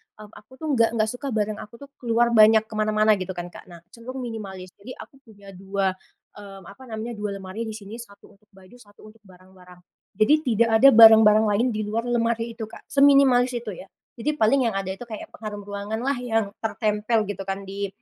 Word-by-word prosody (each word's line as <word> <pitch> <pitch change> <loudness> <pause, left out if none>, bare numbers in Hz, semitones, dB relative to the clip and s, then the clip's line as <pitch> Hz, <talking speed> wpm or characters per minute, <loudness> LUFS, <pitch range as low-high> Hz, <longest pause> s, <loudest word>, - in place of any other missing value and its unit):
mmm, 210 -1 -14
aku 215 +2 -18
tuh 315 +4 -7
nggak 230 -4 +3
nggak 220 -1 +1
suka 250 +3 -7
barang 210 0 -2
aku 210 - -11
tuh 280 +4 -13
keluar 235 0 +1
banyak 220 -1 +6
ke 220 - -15
mana-mana 215 -1 +2
gitu 185 0 -6
kan 175 0 -7
Kak. - - -14
Nah, 170 -2 -14
cenderung 255 +4 -8
minimalis 195 -6 -8
jadi 240 +6 -10
aku 270 - -14
punya 200 -2 -15
2, 195 +1 -2 0.5
mmm, 195 -1 -12
apa 260 +6 -15
namanya 225 +1 -6
2 210 -1 -4
lemari 195 +4 -7
di 220 - -6
sini, 215 +2 -10
1 200 -4 -14
untuk 210 - -34
baju 190 +4 -18
1 205 -3 -20
untuk 225 - -25
barang-barang, 185 -1 -18 0.4
jadi 215 +8 +3
tidak 235 -5 +1
ada 275 - +7
barang-barang 220 -1 +8
lain 220 +5 +1
di 215 - -2
luar 230 +3 -3
lemari 230 -1 -1
itu 225 - -7
Kak 220 - -11
seminimalis 275 -3 +4
itu 215 -5 -8
ya. 190 - -12 0.2
Jadi 295 +6 -3
paling 250 +1 +2
yang 220 - -3
ada 195 -1 -3
itu 190 - -9
kayak 220 -2 -9
pengharum 210 -2 -8
ruanganlah 210 +6 -4
yang 225 -4 -1
tertempel 215 0 -1
gitu 195 - -8
kan 195 +1 -4
di 200 +1 -5
215 Hz, 205 wpm, -23 LUFS, 200-235 Hz, 0.5 s, barang-barang